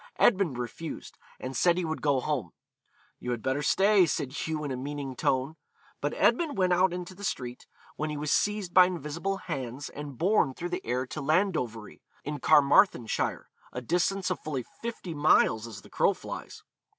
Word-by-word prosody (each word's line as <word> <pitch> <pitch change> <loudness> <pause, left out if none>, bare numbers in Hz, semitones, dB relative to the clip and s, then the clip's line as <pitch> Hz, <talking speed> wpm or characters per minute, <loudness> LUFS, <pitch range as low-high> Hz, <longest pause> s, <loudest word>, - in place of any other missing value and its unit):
Edmund 185 - +3
refused, 125 +7 -6 0.2
and 130 +1 -5
said 175 -1 +3
he 180 - 0
would 160 0 -3
go 140 -3 +2
home. 130 - -2 0.7
'You 125 - -5
had 120 -2 -2
better 135 +2 0
stay,' 195 +4 +4
said 135 -3 -2
Hugh 155 +1 -3
in 145 - -3
a - - -1
meaning 140 0 -5
tone. 135 +5 0 0.4
But 145 +1 -1
Edmund 290 - +2
went 185 -2 +3
out 180 +1 +4
into 180 +1 -5
the 200 +2 -12
street, 125 -9 -4 0.3
when 155 +1 -2
he 150 - -4
was 150 0 -2
seized 205 -4 0
by 185 -1 +8
invisible 175 +3 -3
hands 135 -4 -5
and 145 -3 -8
borne 180 - +2
through 175 - -4
the 180 +2 -3
air 125 +2 -1
to 155 +4 -6
Landovery, 140 - -1 0.2
in 150 0 -4
Carmarthenshire, 145 - +3 0.2
a 125 - -5
distance 180 +7 0
of 180 - -2
fully 140 -5 -3 0.2
fifty 225 -7 -5
miles 145 -7 +3
as 110 -4 -10
the - - -15
crow - - +3
flies. - - -8
150 Hz, 180 wpm, -28 LUFS, 130-180 Hz, 0.7 s, by